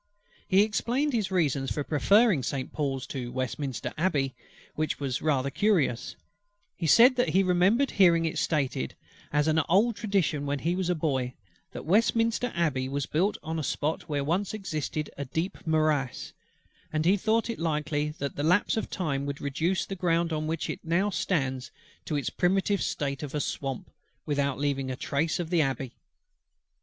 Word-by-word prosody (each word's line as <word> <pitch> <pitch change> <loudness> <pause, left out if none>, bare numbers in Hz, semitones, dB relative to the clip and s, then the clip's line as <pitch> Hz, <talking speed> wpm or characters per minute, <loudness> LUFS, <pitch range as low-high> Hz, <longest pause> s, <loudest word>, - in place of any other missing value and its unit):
He 195 +1 +5
explained 245 +7 0
his 215 -5 0
reasons 145 -8 +1
for 145 - -1
preferring 190 - +4
Saint 130 +1 -3
Paul's 135 -4 -2
to 125 -3 -5
Westminster 130 0 -3
Abbey, 145 -7 +1 0.4
which 155 0 -2
were 140 -2 -2
rather 140 -3 +1
curious: 170 - +1 0.6
he 170 - -2
said 250 - +7
that 245 - +2
he 190 +2 +3
remembered 190 +9 +3
hearing 170 -4 +4
it 160 - -1
stated 135 - -1 0.4
as 150 +1 +2
an 160 0 +3
old 210 +6 +4
tradition 170 - 0
when 145 0 0
he 170 +5 -1
was 185 -1 -1
a 180 - +2
boy, 130 -6 -1 0.4
that - - -8
Westminster 230 +5 +2
Abbey 140 -6 0
was 140 0 -2
built 185 +7 0
on 160 +1 -3
a - - -3
spot 150 +4 -2
where 145 -2 0
once 180 +8 -1
existed 155 -6 -3
a 140 - -2
deep 160 +7 -4
morass; 155 -5 0 0.6
and 155 0 0
he 185 +4 +5
thought 220 +3 +1
it 230 - -4
likely 150 -2 -1
that 140 0 -4
the 145 - -2
lapse 180 +7 +3
of 220 - -2
time 140 -7 -2
would 140 0 -4
reduce 160 +7 -1
the - - -6
ground 170 -2 +1
on 155 0 -2
which 160 0 -2
it - - -4
now 175 +5 +1
stands 135 -9 -1 0.4
to 155 - -2
its 145 - -1
primitive 195 +2 +1
state 140 -2 -2
of 150 -1 -5
a - - +1
swamp, 135 -2 -4 0.3
without 140 -2 0
leaving 140 -2 -1
a 130 - -2
trace 160 +6 -1
of 170 -1 -4
the 170 -2 +4
Abbey. 135 -3 -2
155 Hz, 175 wpm, -28 LUFS, 140-190 Hz, 0.6 s, said